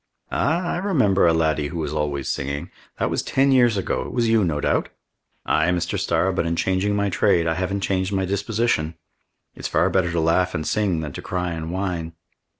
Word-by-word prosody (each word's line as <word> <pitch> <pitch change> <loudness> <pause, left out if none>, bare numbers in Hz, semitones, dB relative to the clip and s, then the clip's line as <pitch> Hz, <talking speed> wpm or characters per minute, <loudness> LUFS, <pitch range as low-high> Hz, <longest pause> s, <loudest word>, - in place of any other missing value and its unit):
"Ah, 165 +6 +1
I - - -1
remember 130 - +2
a - - +5
laddie 80 -2 +1
who 85 +4 -6
was 80 -1 -3
always 75 -3 -2
singing. 70 0 -3 0.3
That - - -1
was - - 0
ten 135 +1 +2
years 120 -5 +4
ago. 95 - -1
It - - -7
was 120 -2 +1
you, 110 -2 +3
no 80 -5 0
doubt?" - - 0 0.6
"Ay, 80 +2 +2
Mr. 90 -1 -1
Starr, 95 +1 +1
but 90 -2 0
in 85 - 0
changing 95 +3 0
my 100 -1 0
trade, 90 -3 +2
I 80 - +1
haven't 95 +3 -2
changed 95 0 0
my 95 -1 0
disposition. 100 -4 0 0.6
It's - - -5
far 90 +3 +2
better 90 -2 +1
to 85 - 0
laugh 85 +3 +2
and 75 - -2
sing 100 -6 0
than 75 -2 -5
to - - -6
cry 90 -1 -2
and 80 -1 -5
whine!" 90 -3 -3
90 Hz, 210 wpm, -23 LUFS, 80-100 Hz, 0.6 s, a